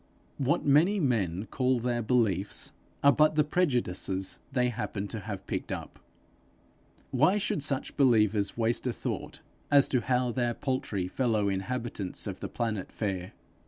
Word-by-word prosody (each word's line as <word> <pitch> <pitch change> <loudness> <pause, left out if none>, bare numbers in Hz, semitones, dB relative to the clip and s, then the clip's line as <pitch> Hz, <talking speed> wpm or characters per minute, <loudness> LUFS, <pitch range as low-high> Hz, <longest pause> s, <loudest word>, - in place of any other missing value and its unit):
What 140 0 +1
many 160 +9 +4
men 105 - 0
call 130 +1 +1
their 120 0 -1
beliefs, 105 -5 0 0.3
are 140 - +8
but 155 +1 +4
the 150 - +4
prejudices 120 - -1
they 125 -2 +2
happen 105 -3 -4
to 115 - -5
have 100 -2 -6
picked - - -4
up: - - -6 1.1
why 155 +10 +4
should 200 -7 -1
such 140 -2 -1
believers 110 -7 +3
waste 115 +2 0
a 125 - 0
thought - - -5 0.3
as 140 -1 +6
to 125 - +2
how 125 -1 +1
their 120 -1 0
paltry 110 -8 -2
fellow 110 -1 +1
inhabitants 100 0 -3
of - - -5
the - - -5
planet 110 -5 -3
fare? 95 -4 -3
120 Hz, 150 wpm, -29 LUFS, 100-135 Hz, 1.1 s, are